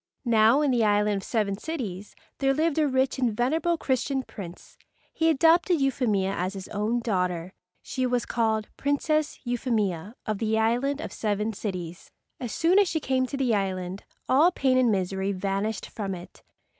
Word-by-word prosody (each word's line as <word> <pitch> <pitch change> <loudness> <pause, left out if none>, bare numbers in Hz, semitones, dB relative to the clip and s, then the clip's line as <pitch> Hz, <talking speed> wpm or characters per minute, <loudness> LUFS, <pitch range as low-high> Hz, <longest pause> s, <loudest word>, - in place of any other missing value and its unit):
Now 230 +3 +5
in 290 -3 +2
the 240 -2 +2
island 210 -1 +2
of 195 - -5
Seven 205 -3 -1
Cities 215 - -5 0.2
there 270 0 +2
lived 315 +1 +1
a 305 - +3
rich 265 0 +1
and 235 -5 0
venerable 320 +7 +1
Christian 265 -1 -1
prince. 180 -7 -10 0.4
He 325 0 +2
adopted 330 +3 +4
Euphemia 225 -8 +1
as 185 +2 -2
his 190 -1 -7
own 215 +3 -1
daughter. 180 -5 -1 0.3
She 255 -1 -1
was 245 -1 0
called 220 -2 0
Princess 300 +2 0
Euphemia 220 -6 -1
of 215 -2 -2
the 220 -1 +1
island 245 +6 +1
of - - -6
Seven 210 +1 -1
Cities. 180 -5 -6 0.3
As 245 -3 -4
soon 350 +4 +3
as 405 - +4
she 320 - 0
came 260 -3 0
to 275 - -4
the 255 -4 +1
island 190 -2 -2 0.2
all 305 +7 +5
pain 265 -6 +1
and 245 -3 +4
misery 190 0 -1
vanished 195 +3 -2
from 195 -3 -4
it. 175 0 -12
230 Hz, 170 wpm, -26 LUFS, 200-270 Hz, 0.4 s, Now